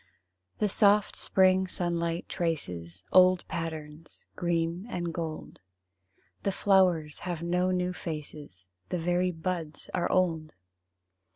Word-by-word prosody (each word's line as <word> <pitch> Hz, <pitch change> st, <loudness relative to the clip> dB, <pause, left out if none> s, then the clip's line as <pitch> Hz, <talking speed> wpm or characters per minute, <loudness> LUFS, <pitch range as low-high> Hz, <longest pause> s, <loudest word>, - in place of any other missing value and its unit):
The 210 Hz, -, +2 dB
soft 205 Hz, 0 st, +3 dB
spring 190 Hz, 0 st, +3 dB
sunlight 170 Hz, -2 st, -2 dB
traces 90 Hz, -, -3 dB
Old 185 Hz, -1 st, +5 dB
patterns 160 Hz, -1 st, -6 dB
green 170 Hz, +2 st, -1 dB
and 175 Hz, -6 st, -3 dB
gold; 160 Hz, -2 st, -5 dB, 0.8 s
The 200 Hz, -, 0 dB
flowers 185 Hz, -6 st, +2 dB
have 175 Hz, -2 st, -4 dB
no 180 Hz, +2 st, +1 dB
new 180 Hz, 0 st, 0 dB
faces, 150 Hz, -, -7 dB, 0.2 s
The -, -, -1 dB
very 175 Hz, +2 st, +1 dB
buds 165 Hz, -2 st, -5 dB
are 175 Hz, -, 0 dB
old! 165 Hz, -4 st, +1 dB
170 Hz, 110 wpm, -29 LUFS, 160-185 Hz, 0.8 s, Old